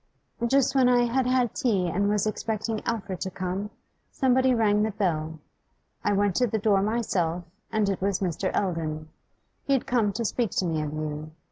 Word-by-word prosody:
'Just 270 +1 +3
when 260 -2 +4
I 245 -1 +4
had 250 +2 +1
had 255 -2 +2
tea 210 -10 +1
and 200 +4 +1
was 210 -1 +1
expecting 215 0 -2
Alfred 200 -5 -3
to 190 - -2
come, 185 +2 -3 0.4
somebody 260 -1 +2
rang 210 -3 +3
the 215 - +1
bell. 160 -6 -1 0.7
I 205 - +2
went 200 -1 +2
to 250 - +3
the 220 - -1
door 205 -2 +3
myself, 190 -6 0 0.3
and 215 -2 +1
it 195 -2 -1
was 195 -1 0
Mr. 185 0 -1
Eldon. 155 -4 -3 0.5
He 275 - +1
had 265 - +1
come 230 -5 +1
to 230 +3 -2
speak 230 +1 0
to 185 - +2
me 160 -2 0
of 150 -1 -3
you. 155 0 -4
205 Hz, 190 wpm, -26 LUFS, 180-235 Hz, 0.7 s, when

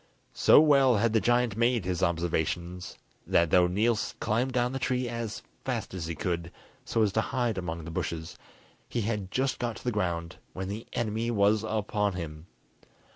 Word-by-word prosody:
So - - +7
well 140 -6 +5
had 110 +2 +2
the 110 - +3
giant 120 0 +2
made 115 -3 +2
his 90 -2 -1
observations, 85 +1 -1 0.3
that 85 -2 +3
though 90 -1 +5
Niels 105 +4 0
climbed 120 +4 0
down 125 -1 +1
the 135 - -3
tree 125 -1 0
as 115 -2 -4 0.2
fast - - -3
as 85 -3 -4
he 85 - -3
could, 85 +1 -2 0.3
so 115 - +1
as 105 - +2
to 110 - +1
hide 120 -4 -1
among 85 -3 -5
the 85 - -6
bushes, 80 +1 -4 0.5
he 120 - -1
had 105 -3 -2
just 130 +5 0
got 120 -2 -2
to - - -11
the 125 - 0
ground 85 -5 -2 0.2
when 95 +1 -4
the 105 +3 -6
enemy 115 0 -1
was 105 -1 +3
upon 105 -2 0
him. 80 -2 -7
105 Hz, 180 wpm, -28 LUFS, 90-120 Hz, 0.5 s, So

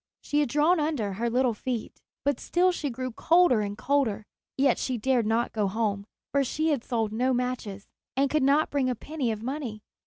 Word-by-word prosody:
She 295 - -1
had 295 - +1
drawn 305 +6 +3
under 290 -10 -1
her 235 +5 -1
little 250 0 +2
feet, 235 +1 -5 0.2
but 285 -3 +1
still 365 +1 +2
she 305 -5 -3
grew 255 +1 -4
colder 330 -2 +4
and 205 0 -4
colder; 250 -7 0 0.3
yet 270 -2 +3
she 255 -2 -1
dared 240 -1 +1
not 230 +2 0
go 210 -3 +1
home, 205 -1 -1 0.2
for 280 -1 +2
she 310 +5 -1
had 280 -6 0
sold 225 -3 -1
no 255 +3 +1
matches, 240 -5 -3 0.3
and 275 +1 +3
could 305 +2 +1
not 280 +3 +3
bring 275 -3 +1
a 250 - -1
penny 275 0 -3
of 215 0 -5
money. 245 -5 -4
255 Hz, 205 wpm, -27 LUFS, 225-285 Hz, 0.3 s, colder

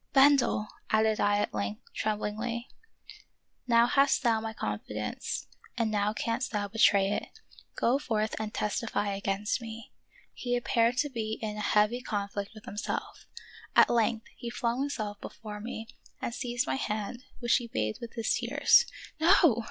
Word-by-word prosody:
" - - -45
Bendel," 270 -6 +5 0.2
added 220 0 +3
I 205 0 +3
at 205 - -1
length, 105 0 -3
tremblingly, 220 +3 -2 0.5
" - - -29
now 235 - +7
hast 275 +2 +3
thou 225 -3 +3
my 225 0 -3
confidence, 105 - -4 0.3
and 225 -2 +1
now 205 0 +1
canst 230 +3 -2
thou 205 -2 -1
betray 200 -2 +4
it; - - -2 0.5
go 255 +4 +2
forth 220 -6 -1
and 215 -1 -3
testify 210 -2 -1
against 200 +3 -1
me." 225 0 -8 0.4
He 245 -1 -2
appeared 240 0 +2
to 290 +1 +1
be 220 -4 -3
in 215 -1 -3
a - - -5
heavy 210 +4 +2
conflict 200 -2 -3
with 215 - -12
himself; 210 - -5 0.5
at - - +7
length 225 -1 +1
he 240 - -6
flung 235 +1 -1
himself 215 -8 -3
before 210 -2 -8
me 225 0 -6 0.3
and 235 - -3
seized 240 0 -1
my 130 0 -1
hand, 215 - -3 0.2
which 240 -2 +3
he 240 -3 -5
bathed 110 - -2
with 235 -1 -7
his 230 -2 0
tears. 275 +5 +4 0.3
"No!" 330 - +5
220 Hz, 160 wpm, -29 LUFS, 210-240 Hz, 0.5 s, now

